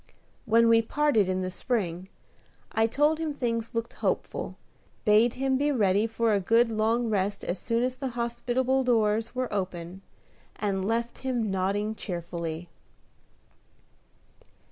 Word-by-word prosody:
When 230 +1 +5
we 230 0 +6
parted 230 -5 +2
in 185 0 0
the 185 - -3
spring, 185 -5 -2 0.6
I 225 0 +2
told 295 +6 +2
him 310 -3 -2
things 230 -2 -2
looked 230 +1 -2
hopeful, - - -2 0.5
bade 220 +2 +4
him 265 0 +1
be 290 +1 +2
ready 210 -4 +2
for 225 0 +1
a 200 - +3
good 230 +5 +3
long 225 +2 +1
rest 200 -1 -1
as 180 - -3
soon 230 +1 0
as 255 0 -1
the 270 0 -3
hospitable 245 +2 0
doors 225 -1 +1
were 255 -3 -2
open, 185 -2 -4 0.5
and 195 -2 -1
left 230 +3 -1
him 245 -5 -1
nodding 200 +3 0
cheerfully. 170 -4 -5
225 Hz, 140 wpm, -27 LUFS, 195-245 Hz, 0.6 s, we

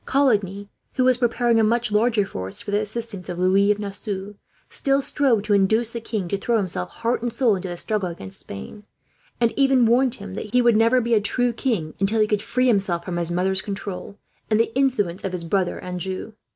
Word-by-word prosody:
Coligny, 205 -8 +1 0.3
who 255 - +1
was 255 -1 +4
preparing 240 -1 +2
a - - +4
much 230 +1 +1
larger 215 0 +2
force 95 - -6
for - - -4
the 205 - +2
assistance 215 -3 -5
of 175 - -4
Louis 190 +3 +3
of 210 - +3
Nassau, 200 -1 -5 0.3
still 275 -1 +1
strove 270 -6 +2
to 210 -1 +1
induce 220 +4 +2
the 235 - -5
king 215 -5 -3
to 200 - -1
throw 235 +3 +1
himself 170 - -2
heart 230 - -2
and 240 0 -2
soul 235 -3 +2
into 190 0 -5
the 175 -1 -5
struggle 200 -1 -2
against 95 - -8
Spain; 100 - -9 0.6
and 235 -1 +2
even 270 -3 +4
warned 245 +2 +3
him 200 -2 -9
that 210 +1 -6
he 250 - +6
would 235 -2 +5
never 230 +3 +4
be 235 0 0
a 215 - +4
true 245 +3 0
king, 220 - -2
until 200 +3 +1
he 215 - +5
could 210 -1 0
free 255 +1 0
himself 195 -7 +1
from 180 -2 -3
his 170 -1 0
mother's 190 +2 +1
control 200 0 -6 0.3
and 215 -1 +3
the 230 0 +1
influence 240 -10 0
of 190 - -3
his 180 -2 -3
brother 180 +2 0
Anjou. 185 +4 -5
210 Hz, 215 wpm, -23 LUFS, 190-235 Hz, 0.6 s, he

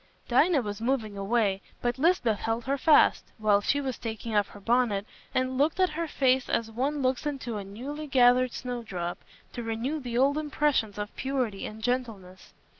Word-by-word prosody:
Dinah 285 +3 +3
was 205 0 -5
moving 230 -4 -1
away, 200 -1 0 0.2
but 240 +1 -2
Lisbeth 265 - +2
held 225 +1 -2
her 275 +2 -1
fast, 310 +2 +5
while 210 -2 +3
she 285 +7 +1
was 265 -4 -3
taking 225 -1 -4
off 205 -1 +3
her 205 - -13
bonnet, 225 -2 +1 0.3
and 255 0 -1
looked 310 +5 +2
at 370 -3 +3
her 330 +2 -3
face 260 -3 +2
as 225 -1 0
one 275 +5 -1
looks 255 +3 0
into 260 -6 -4
a 205 - -4
newly 270 +10 -7
gathered 255 -2 +4
snowdrop, 220 -9 -5 0.3
to 240 - -4
renew 235 +7 -2
the 245 -3 -4
old 280 +4 +3
impressions 295 -8 0
of 205 0 -5
purity 255 -7 -2
and 215 +1 -10
gentleness. 220 -7 -3
245 Hz, 180 wpm, -28 LUFS, 215-275 Hz, 0.3 s, fast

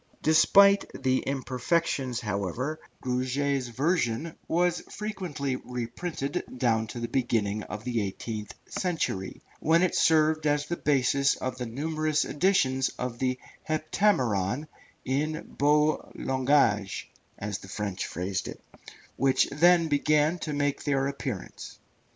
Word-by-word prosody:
Despite 200 +5 +6
its 130 -1 0
imperfections, 130 -1 -1
however, 115 - -2 0.2
Gruget's 130 +1 0
version 145 +2 0
was 175 +1 +1
frequently 180 -11 -3
reprinted 135 +5 -4 0.2
down 115 -3 +1
to 120 - -6
the 120 - -2
beginning 110 -5 0
of 105 0 -7
the 120 -2 -1
eighteenth 105 +2 -5
century, 160 - -3 0.2
when 165 +3 +3
it 185 - +2
served 155 -1 +3
as 145 0 +1
the 170 - -2
basis 140 -2 +2
of 130 0 -4
the 125 - -3
numerous 155 +4 0
editions 145 -6 +2
of 125 -1 -4
the 130 -1 0 0.3
Heptameron 150 - +1 0.4
in 150 +4 -1
beau 150 +1 +2
langage, 130 -7 +1 0.3
as 100 -1 -4
the - - -12
French 100 -2 -3
phrased 95 +3 -3
it, - - -7 0.6
which 135 0 +3
then 170 +3 +5
began 150 +3 +2
to 155 - -4
make 145 -1 -1
their 135 -2 +1
appearance. 135 -7 -5
135 Hz, 120 wpm, -28 LUFS, 120-155 Hz, 0.6 s, Despite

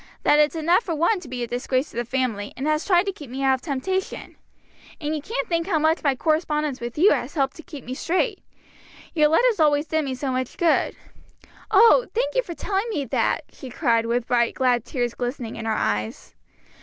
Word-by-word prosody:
that 295 - +4
it's 300 +2 +3
enough 335 +5 +3
for 335 - -3
one 345 +7 +2
to 330 - -12
be 250 -1 -4
a - - -3
disgrace 255 +3 -1
to - - -16
the 240 - -1
family, 240 -5 -2
and 265 - -3
has 305 +1 +1
tried 360 -1 +3
to 395 - -1
keep 295 -8 -11
me 265 +2 -4
out 265 0 +4
of 260 - -2
temptation. 360 +7 -3 0.6
And 305 -1 -2
you 300 - -4
can't 460 +8 -3
think 335 0 -1
how 355 -5 +1
much 315 +2 +2
my 280 -3 +1
correspondence 300 -2 0
with 240 +2 -6
you 375 +7 +6
has - - -1
helped 270 -3 0
to - - -9
keep 295 -5 -10
me 250 - -5
straight. 375 - -1 0.7
Your 305 -3 +4
letters 435 +7 +3
always 295 -1 +3
did 315 0 0
me 265 -2 -3
so 265 +1 -3
much 255 -1 -3
good." 340 -2 +2 0.7
"Oh, 460 +4 +6
thank - - 0
you - - +2
for 350 -8 -8
telling 400 +6 -2
me 295 -11 -2
that!" 235 - 0
she 265 - -10
cried, 230 -4 +1
with 235 0 0
bright, 235 -1 +1
glad 245 -3 +1
tears 240 -3 -2
glistening 245 -2 -4
in 225 - -6
her 225 - 0
eyes. 105 +1 -2
295 Hz, 220 wpm, -23 LUFS, 255-340 Hz, 0.7 s, you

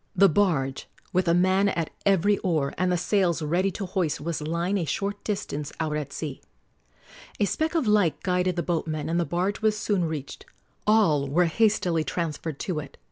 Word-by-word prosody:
The 195 +2 +7
barge, 150 -8 +1 0.3
with 180 0 +2
a 170 - +4
man 190 +3 +3
at 165 -4 -2 0.2
every 200 +1 +3
oar 155 -6 0
and 185 0 +1
the 180 - +2
sails 175 -2 +1
ready 175 +6 +1
to 195 +1 -5
hoist, 180 -4 -1
was 160 +1 -3
lying 170 +6 -1
a - - -1
short 200 +7 -3
distance 150 -8 -3
out 155 -2 -1
at 150 -2 -4
sea. - - -5 1.0
A 205 - +3
speck 315 - -1
of 320 - +2
light 205 -9 +3
guided 180 -1 +1
the 170 - -1
boatmen, 155 -2 -2
and 170 +1 +1
the 170 - +1
barge 185 +6 -1
was 215 -1 +2
soon 205 -4 0
reached. 155 -4 -5 0.4
All 175 -10 +4
were 170 +6 +3
hastily 175 -3 +2
transferred 160 -3 -3
to 175 -5 -2
it. 145 - -9
175 Hz, 190 wpm, -26 LUFS, 155-195 Hz, 1.0 s, The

